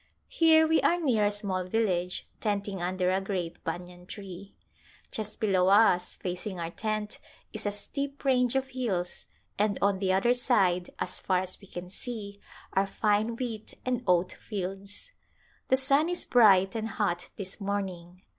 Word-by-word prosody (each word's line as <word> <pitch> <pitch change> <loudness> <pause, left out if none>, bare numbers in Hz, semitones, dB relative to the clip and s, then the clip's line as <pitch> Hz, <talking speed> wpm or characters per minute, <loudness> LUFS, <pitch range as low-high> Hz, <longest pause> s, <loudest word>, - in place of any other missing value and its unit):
Here 320 -1 +5
we 320 0 +3
are 350 - +3
near 245 -10 +2
a 205 - +2
small 200 -3 -1
village, 180 -3 0
tenting 200 -3 -2
under 185 +1 0
a 190 +1 +1
great 185 -4 -4
banyan 175 +2 -6
tree. 195 -1 -8 0.6
Just 215 -1 -4
below 190 -5 +3
us, 195 -3 +4
facing 180 +1 -5
our 165 0 -3
tent 215 +1 -3 0.3
is 215 -1 -3
a - - +1
steep 280 +7 -5
range 250 -2 +3
of 265 0 0
hills, 215 -9 -3 0.3
and 205 -1 +2
on 200 -1 +2
the 190 -1 +1
other 195 +6 +3
side 195 -8 +2
as 180 - -1
far 185 -1 +1
as 185 +2 +1
we 200 - -13
can 175 -1 -7
see 200 0 -6 0.3
are 195 +1 +2
fine 210 +3 +1
wheat 230 -3 -5
and 250 -1 0
oat 180 0 +3
fields. 200 - -6 0.6
The 260 - +4
sun 275 +4 +3
is 355 - -1
bright 195 -6 +5
and 220 -1 -2
hot 180 -6 -2
this 195 +1 -6
morning. 185 -3 -4
200 Hz, 165 wpm, -29 LUFS, 185-230 Hz, 0.6 s, Here